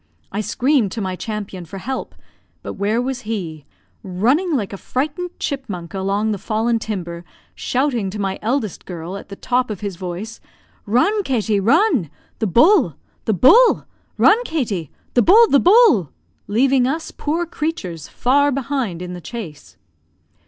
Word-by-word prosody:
I 205 - -2
screamed 245 0 +1
to - - -4
my 190 -3 -2
champion 200 -3 -5
for 170 +4 -9
help; 260 +7 -5 0.5
but - - -5
where 205 +4 0
was 255 0 -2
he? 180 -10 -5 0.3
running 255 - +1
like 210 -6 -2
a - - -5
frightened 300 - -3
chipmunk 205 - -5
along 200 +3 0
the 205 - -3
fallen 225 +3 0
timber, 175 -6 -5 0.3
shouting 245 -6 -1
to 205 - -6
my 195 -2 -2
eldest 225 -3 -2
girl, 175 +1 -6
at 200 - -9
the 200 - -7
top 250 +3 0
of 210 -4 -5
his 200 -4 -4
voice 185 +5 -6 0.5
"Run 325 - +2
Katty, 225 - 0
run! 270 - +3 0.3
The 220 - 0
bull, 255 - +4 0.3
the 220 - +2
bull! 460 - +6 0.3
Run, 445 +4 +5
Katty! 220 - -2 0.2
The 245 - +4
bull, 435 - +7
the 280 - +5
bull!" 370 - +5 0.4
leaving 255 +4 +3
us 315 +5 -3
poor 325 +4 -2
creatures 255 - -4
far 285 +3 +2
behind 255 -9 -2
in 180 0 -6
the 180 - -8
chase. 155 - -9
225 Hz, 155 wpm, -20 LUFS, 190-275 Hz, 0.5 s, bull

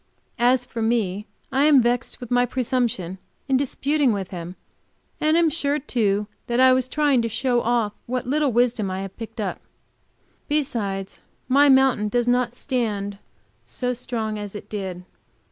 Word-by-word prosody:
As 250 +1 +3
for 235 -2 -6
me, 215 -3 0 0.2
I 270 +2 +3
am 300 -3 +7
vexed 240 0 0
with 245 -1 -9
my 245 0 +4
presumption 240 -7 -1 0.3
in 270 - +2
disputing 280 +1 +1
with 195 -2 -4
him, 175 0 -6 0.6
and 310 +1 +3
am 340 -1 +4
sure, 295 -2 0
too, 210 -8 0 0.2
that 240 +1 0
I 260 0 +7
was 255 -1 +1
trying 285 -3 +2
to 230 - -2
show 245 +2 +1
off 230 -3 +1
what 250 +1 -2
little 290 +2 +1
wisdom 235 -3 +1
I 185 +1 -3
have 195 -1 -7
picked 225 0 -9
up. 205 -3 -2 0.9
Besides, 210 -10 -2 0.3
my 280 +3 +5
mountain 265 -6 +4
does 240 +2 0
not 245 -1 +2
stand 210 -7 -2 0.4
so 250 - -3
strong 225 -3 -3
as 205 0 -7
it 205 - -8
did. 190 -4 -5
240 Hz, 160 wpm, -23 LUFS, 210-260 Hz, 0.9 s, am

